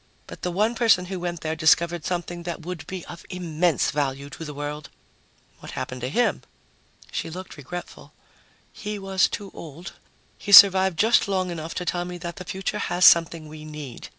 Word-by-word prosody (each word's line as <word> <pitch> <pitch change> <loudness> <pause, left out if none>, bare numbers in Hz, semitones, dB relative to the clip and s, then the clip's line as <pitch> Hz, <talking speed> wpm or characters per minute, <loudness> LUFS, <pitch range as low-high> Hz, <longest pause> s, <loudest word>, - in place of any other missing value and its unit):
But - - -11
the 180 - -2
one 210 +6 +1
person 225 -6 +3
who 185 0 -5
went 175 -2 -4
there 160 0 -2
discovered 165 +1 +2
something 175 -1 -3
that 170 -1 -6
would 180 -3 -6
be 185 -2 -6
of 170 -1 -10
immense 175 -3 0
value 140 -1 -2
to 165 - -8
the 150 - -6
world." 145 +1 -5 0.7
"What - - -10
happened 130 0 -5
to 125 - -2
him?" 240 - +1 0.7
She - - -3
looked 185 +3 -8
regretful. 175 +5 -9 0.6
"He 210 0 -5
was 195 -1 +1
too 200 -1 -6
old. 165 +4 -9 0.5
He 205 - -5
survived 190 -3 +9
just 225 +5 +4
long 185 -2 -1
enough 165 -1 -6
to 180 - -3
tell 175 0 -1
me 180 0 -6
that 170 +2 -7
the 185 - -8
future 190 +2 -3
has 180 -2 +1
something 165 -1 +5
we 155 0 -10
need. 150 -5 -9
175 Hz, 185 wpm, -24 LUFS, 155-185 Hz, 0.7 s, survived